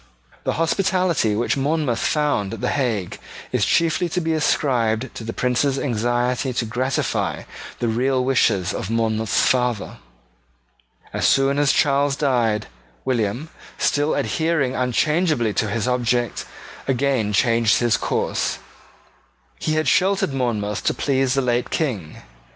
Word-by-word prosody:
The - - +1
hospitality 170 - +1
which 120 +3 0
Monmouth 140 -4 0
found 145 -10 0
at 110 - -11
the - - 0
Hague 115 -10 -2 0.3
is 125 -5 +1
chiefly 165 - +2
to 180 - -1
be 160 -2 -1
ascribed 125 -6 0
to - - -7
the 115 - -4
Prince's 125 +3 0
anxiety 120 +1 0
to 120 - -1
gratify 125 +4 -1 0.3
the 120 - -1
real 125 +3 +1
wishes 105 -8 +2
of 95 - -4
Monmouth's 110 -1 +1
father. 125 -4 0 1.2
As - - +1
soon 135 +1 +3
as 145 -1 +4
Charles 140 -1 +2
died, 120 -7 +1 0.4
William, 120 +4 -1 0.3
still 145 +1 +1
adhering 160 -6 0
unchangeably 130 - +1
to 110 - 0
his 115 +2 -1
object, 120 -2 0 0.4
again 130 -5 +1
changed 115 +1 +3
his 120 -2 +2
course. - - -1 1.0
He 155 - -1
had 155 -1 0
sheltered 190 0 +2
Monmouth 110 -6 -2
to - - +1
please 135 -2 +1
the 135 - +2
late 120 -1 0
King. 110 - -3
125 Hz, 135 wpm, -22 LUFS, 115-145 Hz, 1.2 s, as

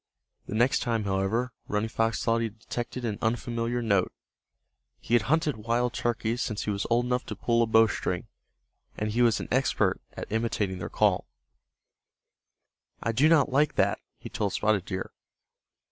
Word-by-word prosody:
The - - -4
next 120 +4 +3
time, 115 -4 0
however, 100 +6 0
Running 105 +1 0
Fox 115 0 0
thought 115 0 +2
he 115 - 0
detected 120 +3 -5
an 105 -3 -2
unfamiliar 120 +1 -1
note. 100 -5 +2 0.9
He 115 - -5
had 115 -4 +4
hunted 155 -4 +2
wild 120 +3 0
turkeys 120 +1 -1
since 110 -5 -2
he 105 - -1
was 100 0 -2
old 120 +1 +3
enough 125 0 0
to - - -4
pull 120 0 +1
a 115 - +3
bowstring, 110 -5 +2 0.7
and 105 0 -1
he 120 +3 +1
was 115 -3 +4
an - - -5
expert 130 +2 +1
at - - -7
imitating 105 -4 -1
their - - -5
call. - - +2 1.8
"I 115 - +1
do 140 +8 +4
not 150 -4 +4
like 145 +3 +2
that," - - +2 0.2
he - - -9
told 100 -2 -2
Spotted 105 -3 +1
Deer. 95 -2 -4
115 Hz, 165 wpm, -28 LUFS, 105-120 Hz, 1.8 s, had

